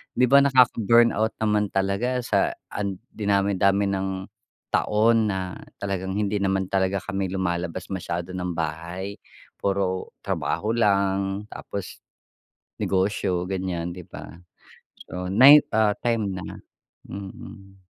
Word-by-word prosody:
'Di 125 - +4
ba 140 +3 +7
nakaka-burnout 120 -4 +4
naman 105 -2 +1
talaga 100 +6 0
sa - - +1 0.2
an 100 -2 -3
dinami 100 -1 +1
dami 100 +1 +3
ng 95 0 -1 0.7
taon 110 0 +3
na 95 -1 -4 0.2
talagang 95 -1 -3
hindi 105 0 0
naman 95 -1 0
talaga 95 +1 0
kami 95 0 -3
lumalabas 90 -2 -2
masyado 90 -1 -4
ng 90 -1 -3
bahay 85 +4 -4 0.4
puro 95 -2 -1
trabaho 110 +2 -1
lang 100 -2 +1
tapos, 100 -4 -7 0.8
negosyo 95 -2 0
gan'yan, 90 -2 -3
'di 90 -1 -10
ba? 85 - -10 0.7
So, 90 0 -5
nay 135 +9 +9 0.2
ah, 110 -2 +4
time 115 -5 0
na, 95 -1 -6 0.6
mm. 95 0 -10
95 Hz, 115 wpm, -24 LUFS, 95-105 Hz, 0.8 s, nay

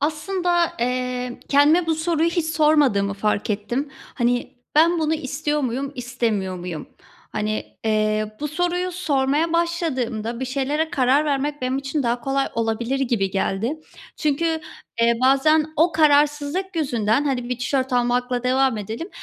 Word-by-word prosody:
Aslinda, 345 +3 0
eee, 250 0 -2
kendime 300 +5 +4
bu 325 - +2
soruyu 325 +1 +1
hiç 340 -2 -1
sormadığımı 295 -11 +3
fark 210 +1 -1
ettim. 240 +8 -2 0.2
Hani, 245 +2 0 0.2
"Ben 335 +3 +5
bunu 315 0 +1
istiyor 295 0 -2
muyum, 270 +2 -2
istemiyor 230 -7 -2
muyum?" 175 -4 -6 0.4
Hani, 215 0 -2 0.2
eee, 215 0 0
bu 300 - -2
soruyu 355 +3 -1
sormaya 300 -1 0
başladığımda 260 -10 -1
bir - - -1
şeylere 280 +5 -1
karar 275 -1 +3
vermek 290 -1 -1
benim 255 +1 0
için 275 +1 -2
daha 240 0 0
kolay 270 +1 0
olabilir 230 +4 -1
gibi 230 -7 0
geldi. 220 +10 -1 0.4
Çünkü, 320 +2 0 0.4
eee, 235 0 +4
bazen 300 +4 +4
o 335 +2 +3
kararsızlık 300 +4 +2
yüzünden, 240 -3 +1
hani 250 -3 -1
bir 250 -1 -2
tişört 260 +1 -1
almakla 245 0 +1
devam 260 -2 +2
edelim. 225 - -5
270 Hz, 140 wpm, -22 LUFS, 240-310 Hz, 0.4 s, Ben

